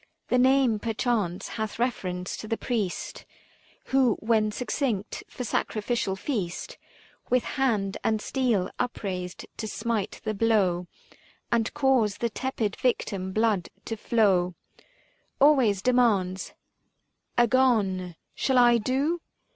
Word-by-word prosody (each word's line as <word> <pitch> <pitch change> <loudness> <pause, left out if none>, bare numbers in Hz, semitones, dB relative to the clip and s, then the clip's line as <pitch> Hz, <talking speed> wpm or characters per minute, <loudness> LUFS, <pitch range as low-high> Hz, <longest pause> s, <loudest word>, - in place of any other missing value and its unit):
The 250 - +3
name 260 -3 +4
perchance 220 -5 -1
hath 220 -2 -4
reference 185 -7 -2
to 215 - -7
the 225 - -1
Priest 215 -7 -3 0.7
Who 260 -5 +4
when 215 -1 +1
succinct 240 -3 -2
for 250 - -6
sacrificial 215 -3 -1
feast 195 -5 -4 0.5
With 250 0 +3
hand 220 -8 0
and 220 -1 +1
steel 225 -6 0
upraised 185 -7 -3
to 220 - -4
smite 225 -2 -2
the 215 - -1
blow 195 -5 +2 0.6
345 235 - +4
And 225 - -2
cause 260 -8 +2
the 235 -1 -1
tepid 225 -4 -2
victim 195 -6 -1
blood 215 -3 +1 0.2
to 225 - -3
flow, 195 -6 +2 0.8
Always 255 -10 +4
demands 215 -7 +2 0.4
" - - -48
Agone," 215 -8 +2
" - - -50
Shall 265 -1 +1
I 240 -1 +6
do 275 +9 0
220 Hz, 125 wpm, -27 LUFS, 195-250 Hz, 0.8 s, I